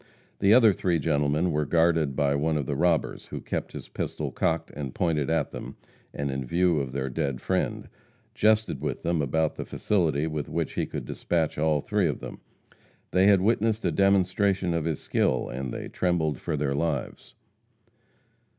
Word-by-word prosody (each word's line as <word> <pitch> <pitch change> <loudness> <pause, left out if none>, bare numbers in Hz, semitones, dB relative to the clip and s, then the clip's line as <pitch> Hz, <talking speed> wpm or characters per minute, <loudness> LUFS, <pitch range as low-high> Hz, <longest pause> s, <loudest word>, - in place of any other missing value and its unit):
The 100 0 +4
other 115 -3 +7
three 90 -2 0
gentlemen 75 +2 +1
were 75 0 +1
guarded 80 -4 +2
by 70 -1 +2
one 75 +2 +1
of 70 - -2
the 70 - -2
robbers, 85 +1 0
who - - -6
kept - - -4
his - - -8
pistol - - -4
cocked 80 0 -1
and 70 -3 -6
pointed 75 -5 0
at 80 -3 0
them, - - -7 0.4
and 70 -1 -3
in 65 0 -3
view 85 +5 +2
of 65 -2 -3
their 65 0 -2
dead 70 -1 -2
friend, - - -1 0.5
jested 110 -9 +2
with 75 -1 -3
them 85 -2 +1
about 80 +2 0
the - - -3
facility 80 -8 0
with 75 -2 -3
which - - -2
he - - -1
could - - -5
dispatch 80 -4 -1
all 75 -1 +2
three 105 0 +1
of 75 - -2
them. - - -8 0.7
They 95 +2 +4
had 100 -2 +5
witnessed 110 +1 +1
a 85 - +2
demonstration 95 0 +2
of 85 -2 -1
his 80 -3 -1
skill, 65 - 0
and 65 0 -4
they - - -5
trembled 80 -6 0
for 80 -3 -3
their 70 -1 0
lives. 70 -3 -3
80 Hz, 180 wpm, -26 LUFS, 70-90 Hz, 0.7 s, other